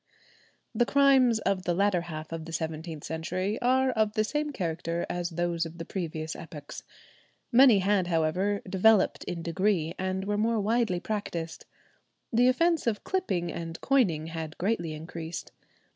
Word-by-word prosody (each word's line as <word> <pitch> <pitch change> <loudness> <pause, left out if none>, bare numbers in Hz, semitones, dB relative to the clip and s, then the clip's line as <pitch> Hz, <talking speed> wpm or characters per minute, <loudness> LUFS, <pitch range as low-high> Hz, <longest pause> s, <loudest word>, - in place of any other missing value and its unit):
The 240 +1 +2
crimes 270 -4 +5
of 195 -3 0
the 175 - +1
latter 195 -2 +2
half 155 -2 -7
of 165 -1 -5
the 165 - -8
seventeenth 160 -1 -4
century 185 +7 -3
are 260 +1 +3
of 215 -3 +1
the 215 -1 +2
same 295 +6 -1
character 170 - -2
as 175 -1 -2
those 170 0 -1
of 165 0 -7
previous 160 -4 -4
epochs. 150 -3 -9 0.7
Many 250 -3 +7
had, 195 -1 +2
however, 180 +5 0
developed 195 +2 +3
in 170 -1 -4
degree, 170 -1 0
and 190 +1 -2
were 205 +1 -1
more 225 +1 +2
widely 215 -3 +1
practised. 175 -5 -4 0.7
The 245 +2 +5
offence 330 +3 +2
of 215 -3 0
clipping 185 - -1
and 165 -1 -6
coining 190 - +2
had 160 -1 -6
greatly 175 -5 -1
increased. 165 +1 -7
185 Hz, 150 wpm, -28 LUFS, 165-220 Hz, 0.7 s, Many